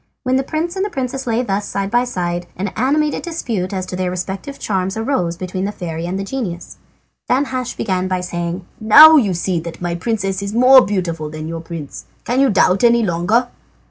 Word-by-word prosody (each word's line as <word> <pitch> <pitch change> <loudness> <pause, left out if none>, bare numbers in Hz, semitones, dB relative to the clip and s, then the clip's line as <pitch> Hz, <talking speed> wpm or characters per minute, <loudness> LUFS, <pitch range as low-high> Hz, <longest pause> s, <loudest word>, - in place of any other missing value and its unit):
When 255 0 +1
the 265 - +2
prince 320 +5 -3
and 390 +2 -2
princess 265 -3 -4
lay 235 +1 +1
thus 205 -3 -2
side 195 0 -3
by 240 +1 +2
side, 175 -6 -3
an 195 +2 -2
animated 290 +8 0
dispute 230 - -3
as 190 -2 -3
to 185 - -6
their 185 0 -1
respective 190 +9 -5
charms 190 0 -2
arose 220 -8 -1
between 185 +1 -4
the 205 - -2
fairy 170 -4 -5
and 185 +2 -3
the 195 - -3
genius. 195 -6 -5 0.5
Danhasch 255 -1 -1
began 185 -3 -1
by 185 -1 -1
saying: 175 0 -4
"Now 310 +9 +9
you 205 -10 +2
see 175 0 -1
that 165 0 -8
my 175 -1 -2
princess 195 0 -2
is 200 +1 -4
more 255 +2 +7
beautiful 170 -6 -2
than 155 0 -7
your 165 0 -5
prince. 165 -3 -8 0.2
Can 245 +2 -1
you 275 - +4
doubt 190 0 +3
any 235 0 +5
longer?" 195 +8 +1
195 Hz, 200 wpm, -18 LUFS, 180-250 Hz, 0.5 s, Now